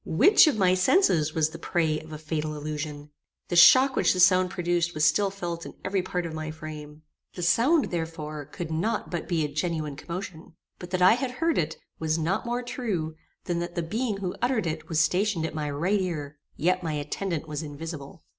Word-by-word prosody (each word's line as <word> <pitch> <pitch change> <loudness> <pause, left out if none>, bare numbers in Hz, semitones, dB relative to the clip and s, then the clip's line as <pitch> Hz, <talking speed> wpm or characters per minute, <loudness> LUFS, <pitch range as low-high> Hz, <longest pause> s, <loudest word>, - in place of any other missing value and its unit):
Which 365 - +6
of 290 - +2
my 185 -3 +4
senses 185 - +3
was 155 -1 +2
the 165 - -9
prey 160 -2 0
of 155 - -13
a 155 - -5
fatal 155 0 -3
illusion? 150 0 -5 0.4
The 175 - -1
shock 255 +11 +7
which - - +3
the 185 - -3
sound 185 0 +5
produced 175 -1 -1
was 155 0 +2
still 195 +6 +3
felt 175 -3 -5
in - - -9
every 190 0 0
part 180 -1 -3
of 165 - -5
my 155 0 -4
frame. 155 -1 -9 0.3
The 180 - -4
sound, 260 - +3
therefore, 160 -3 -4
could 165 +3 -7
not 210 +8 -1
but 175 -2 -3
be 165 -3 0
a - - -1
genuine 150 0 -3
commotion. 170 +1 -7 0.2
But 180 - -8
that 185 -1 0
I 185 - +8
had 250 +1 -2
heard 325 +5 +1
it, 160 -1 -2 0.2
was 160 0 0
not 180 +8 -1
more 240 +1 -1
true 195 - -3 0.3
than 175 -1 -2
that 175 0 -5
the 170 - -1
being 215 +5 -2
who 185 -2 -3
uttered 245 -4 +1
it 155 -1 -4
was 160 -2 +1
stationed 180 +1 +1
at - - -4
my 150 -2 -3
right 175 +8 0
ear; 150 -5 -4 0.2
yet 185 +3 +1
my 165 -3 -3
attendant 155 +3 -3
was 150 -1 -4
invisible. 155 0 -8
170 Hz, 210 wpm, -26 LUFS, 155-185 Hz, 0.4 s, I